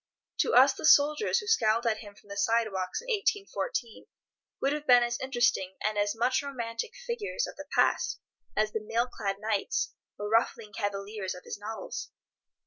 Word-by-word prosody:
To - - +2
us - - +7
the - - -10
soldiers 295 +7 +5
who 435 - -2
scowled 230 - +3
at 220 -2 +1
him 205 -2 -11
from 205 - -21
the 200 - -6
sidewalks 205 - 0
in - - -15
1814 410 - -2 0.5
would 275 +1 +1
have 300 0 -5
been 245 -1 +7
as 240 0 -2
interesting 240 -7 +1
and 215 0 0
as 205 +1 +1
much 250 +3 +2
romantic 250 - -4
figures 470 0 -2
of - - -9
the 290 0 -9
past 475 -1 +2 0.4
as 215 0 +2
the 220 - -2
mail 230 +3 +1
clad 195 -5 -3
knights 215 - -1 0.2
or 205 - -4
ruffling 225 -1 +1
cavaliers 200 -1 -3
of 180 - -11
his - - -7
novels. 220 +2 -6
230 Hz, 175 wpm, -29 LUFS, 205-285 Hz, 0.5 s, us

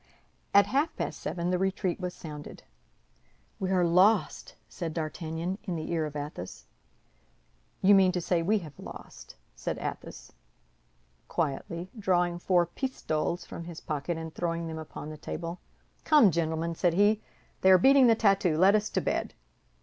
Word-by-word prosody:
At 200 0 +6
half 290 +5 0
past - - -4
seven 175 0 -2
the 180 - +1
retreat 190 -1 -1
was 180 -1 -4
sounded. 150 -2 -9 1.0
"We 190 -2 -2
are 185 -2 +3
lost," 185 +6 +2
said 165 -4 -6
D'Artagnan, 165 +3 -3
in 180 - -3
the 155 0 -4
ear 160 -2 0
of 150 - -10
Athos. 145 - -7 1.2
"You 200 +2 +7
mean 190 -2 +6
to 180 - 0
say 170 0 0
we 205 +6 +2
have 145 -3 -13
lost," - - -11 0.2
said - - -4
Athos, - - -7 1.0
quietly, 170 +3 -3
drawing 175 -3 +1
four 175 -1 +3
pistoles 175 - -3
from 170 - -8
his 170 -1 -8
pocket 155 +2 -3
and 160 -1 -7
throwing 170 -1 -2
them 160 -1 -5
upon 155 -1 -8
the 155 - -8
table. 170 +3 -6 0.4
"Come, 295 - +6
gentlemen," 165 0 -1
said 170 0 +1
he, 205 +2 +3 0.4
"they 190 - +5
are 185 - +9
beating 270 +6 +6
the 230 - +6
tattoo. 195 -7 +2
Let 190 +4 +6
us 215 0 +1
to - - -1
bed!" - - -2
175 Hz, 160 wpm, -28 LUFS, 160-190 Hz, 1.2 s, are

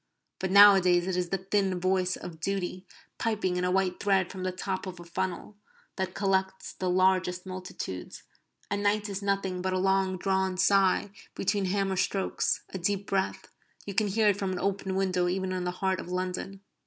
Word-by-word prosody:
But 190 - -2
nowadays 190 -3 +7
it 190 -1 -1
is 180 -1 -1
the 195 - 0
thin 190 -1 0
voice 185 0 +1
of 170 -3 -9
duty, 185 0 -3 0.3
piping 210 -5 0
in 180 - -1
a 180 - +1
white 185 -1 +1
thread 195 -3 +2
from 190 - -7
the 185 0 -1
top 190 +1 -4
of 180 -1 -7
a - - -9
funnel, 190 +3 -4 0.4
that 190 -1 -3
collects 190 -1 -1
the 185 - -2
largest 185 0 +2
multitudes, 185 - -7 0.5
and 205 0 0
night 205 +1 +1
is 200 0 -4
nothing 195 -2 -1
but 185 0 -1
a - - +1
long 190 0 +1
drawn 190 0 0
sigh 195 +1 +3 0.2
between 200 0 0
hammer 195 0 0
strokes, 190 +1 0
a 190 - -3
deep 195 +2 -1
breath 195 -1 -2 0.4
you 200 - -5
can 210 +2 +2
hear 210 +2 +3
it 200 - +1
from 195 -2 -2
an 185 - -3
open 195 -1 -1
window 185 -2 +1
even 185 +1 -1
in 185 -1 -2
the - - 0 0.2
heart 190 -1 +1
of - - -7
London. 185 +2 -4
190 Hz, 190 wpm, -28 LUFS, 185-195 Hz, 0.5 s, nowadays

